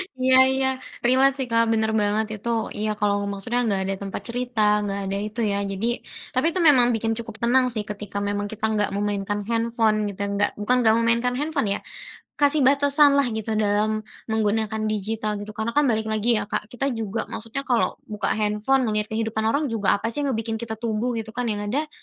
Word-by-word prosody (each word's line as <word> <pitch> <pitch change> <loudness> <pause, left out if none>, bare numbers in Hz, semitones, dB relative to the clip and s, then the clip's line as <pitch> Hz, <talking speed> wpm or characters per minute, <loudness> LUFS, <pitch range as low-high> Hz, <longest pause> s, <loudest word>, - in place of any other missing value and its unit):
Iya 260 0 +4 0.2
iya, 265 0 +2 0.3
relate, 260 +2 +4
sih, 250 - -6
Kak, 230 0 +4
bener 220 0 +1
banget 210 +1 +1
itu. 235 - -4 0.2
Iya, 215 +1 -2
kalau 205 -1 +2
maksudnya 230 +5 -2
nggak 195 -3 0
ada 195 - -1
tempat 195 -1 -5
cerita, 245 -1 -2 0.2
nggak 200 -1 -3
ada 195 - -1
itu, 215 +3 -8
ya. 200 - 0
Jadi 195 +4 -1 0.5
tapi 255 +3 +1
itu 370 - +1
memang 260 -6 +6
bikin 225 0 -1
cukup 225 -2 -7
tenang, 255 +2 +4
sih, 215 - -2
ketika 210 -1 -7
memang 205 0 -2
kita 220 0 -3
nggak 210 -1 +1
memainkan 205 0 -2
handphone, 230 -1 +1
kita 200 +1 -5
nggak 200 +1 +2
bukan 245 +5 +3
nggak 220 -2 +4
memainkan 235 +2 +2
handphone, 300 -7 -1
ya. - - -5 0.6
Kasih 290 +1 +4
batasanlah 280 0 +4
gitu 220 0 -4
dalam 215 +1 +1 0.3
menggunakan 220 0 0
digital 215 +1 -2
gitu, 205 +1 -7
karena 220 +2 -2
kan 295 - +5
balik 220 -1 0
lagi 220 +2 +2
ya, 205 - -2
Kak, 210 - -2
kita 260 +3 -2
juga 225 -2 -3
maksudnya, 230 +5 -4
kalau 245 -4 +1
buka 210 -1 -3
handphone 215 +5 +1
ngelihat 215 -1 0
kehidupan 220 0 -1
orang 285 +6 +1
juga 210 -3 +2
apa, 225 +3 -3
sih, 290 - -2
yang 285 -1 0
ngebikin 225 0 -3
kita 220 -1 -5
tumbuh, 230 +2 -2
gitu, 220 -1 -5
kan, 245 0 -2
yang 205 -1 -2
ada 280 +9 -1
220 Hz, 200 wpm, -23 LUFS, 210-245 Hz, 0.6 s, memang